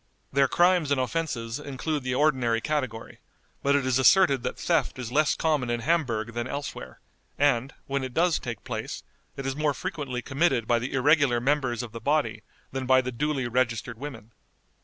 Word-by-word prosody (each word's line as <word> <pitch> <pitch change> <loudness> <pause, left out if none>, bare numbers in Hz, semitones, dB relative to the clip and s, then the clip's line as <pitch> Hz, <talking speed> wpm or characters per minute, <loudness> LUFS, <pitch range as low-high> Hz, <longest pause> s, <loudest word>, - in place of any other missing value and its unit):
Their 135 0 +4
crimes 175 0 +3
and 140 -2 +2
offenses 130 -4 -2
include 145 +2 -3
the 130 0 -2
ordinary 130 -6 +2
category, 130 -4 -3 0.4
but 140 0 +3
it 140 -2 +1
is 130 0 +2
asserted 140 -2 +5
that - - -4
theft - - 0
is 125 -2 -5
less 150 +2 +3
common 150 -6 0
in 120 0 -1
Hamburg 120 -7 0
than 120 +1 -3
elsewhere, 140 - -6 0.4
and, 135 -2 +2
when 140 0 -2
it 130 - -4
does 170 0 +3
take 120 -4 -6
place, - - -5 0.3
it 135 - -5
is 135 0 -2
more 150 -1 0
frequently 135 -8 -4
committed 135 -4 +1
by 120 -1 +3
the 125 +3 -4
irregular 140 -2 +3
members 130 -2 0
of 120 - -8
the 115 +1 -8
body 115 -6 0 0.3
than 130 -1 -4
by 130 0 +5
the 125 0 -4
duly 135 0 -1
registered 120 -1 -1
women. 120 -6 -8
130 Hz, 180 wpm, -26 LUFS, 120-145 Hz, 0.4 s, asserted